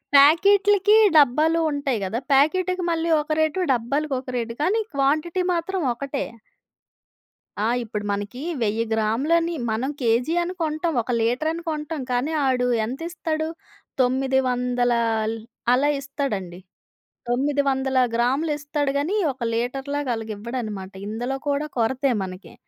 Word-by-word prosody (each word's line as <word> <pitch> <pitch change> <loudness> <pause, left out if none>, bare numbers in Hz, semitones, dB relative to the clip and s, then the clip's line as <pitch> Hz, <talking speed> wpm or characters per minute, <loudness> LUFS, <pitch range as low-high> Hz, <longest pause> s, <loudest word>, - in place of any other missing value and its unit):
ప్యాకీట్లికీ, 395 +7 +6 0.2
డబ్బాలో 305 +4 +4
ఉంటయి 280 -5 -1
గదా! 220 +5 -2
ప్యాకీటికి 365 +6 +2
మళ్ళీ 330 0 -1
ఒక 300 +1 -7
రేటు, 320 +4 0
డబ్బాలకొక 260 +2 -2
రేటు, 230 -1 -3
కానీ 415 +8 +2
క్వాంటిటీ 305 +6 +1
మాత్రం 350 +2 -2
ఒకటే. 275 +3 -3 1.4
ఆ! - - +2 0.2
ఇప్పుడు 210 -2 -5
మనకీ 205 +6 -4 0.2
1000 220 +1 +1
గ్రాములని 285 +11 +1 0.2
మనం 235 +5 -1
కేజీ 245 +7 +2
అని 355 +2 -4
కొంటాం, 315 +1 -1
ఒక 235 - -7
లీటరని 310 +9 0
కొంటాం, 300 0 -4
కానీ 250 +6 0
ఆడు 250 -1 +2 0.2
ఎంతిస్తడు, 315 +4 -3 0.5
తొమ్మిది 260 +1 +2
వందలాల్ 240 -3 0 0.4
అలా 285 +3 +3
ఇస్తడండి. 215 - -4 0.7
900ల 265 0 +1 0.2
గ్రాములిస్తడు 290 +3 0
గనీ, 325 +9 -1 0.2
ఒక 260 - -32
లీటర్‌లాగలగివ్వడనమాట. 235 -5 -3 0.2
ఇందులో 240 +5 -3
కూడా 285 +1 0
కొరతే 260 +4 +1
మనకి. 185 +1 -9
270 Hz, 110 wpm, -23 LUFS, 235-310 Hz, 1.4 s, ప్యాకీట్లికీ